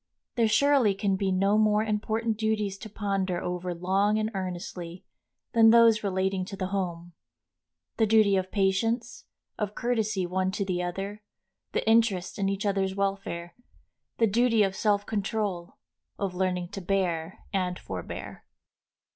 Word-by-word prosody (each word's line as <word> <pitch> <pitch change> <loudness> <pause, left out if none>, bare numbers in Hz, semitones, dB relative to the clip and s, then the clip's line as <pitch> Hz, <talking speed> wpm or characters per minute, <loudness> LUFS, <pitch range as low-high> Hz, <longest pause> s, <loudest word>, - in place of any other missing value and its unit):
There 230 -2 +2
surely 265 -3 +4
can 195 -1 0
be 190 0 0
no 195 +3 +3
more 215 0 +3
important 220 +1 -1
duties 210 -2 -1
to 220 - -8
ponder 195 -3 -1
over 180 0 -3
long 195 +4 +1
and 215 0 -1
earnestly 180 -2 -6 0.5
than 225 -2 +7
those 230 -1 +6
relating 190 -1 0
to 195 - -7
the 185 -1 -3
home, 175 -3 -3 0.8
the 220 - +3
duty 210 -2 +5
of 185 0 -1
patience, 225 +5 0 0.3
of 210 -1 -2
courtesy 215 -5 0
one 185 +1 0
to 200 0 -1
the 180 -2 -1
other, 195 +4 -4 0.5
the - - -1
interest 220 -5 +2
in 195 0 +1
each 195 +1 -2
other's 195 -1 0
welfare, 195 -4 -3 0.6
the 230 - +4
duty 230 +1 +3
of 195 -1 -1
self 205 -1 +1
control, 205 -4 -3 0.4
of 195 -2 -2
learning 180 -1 -1
to 195 - -6
bear 180 -1 -2
and 180 -2 0
forbear. 90 -2 -7
195 Hz, 145 wpm, -27 LUFS, 185-215 Hz, 0.8 s, than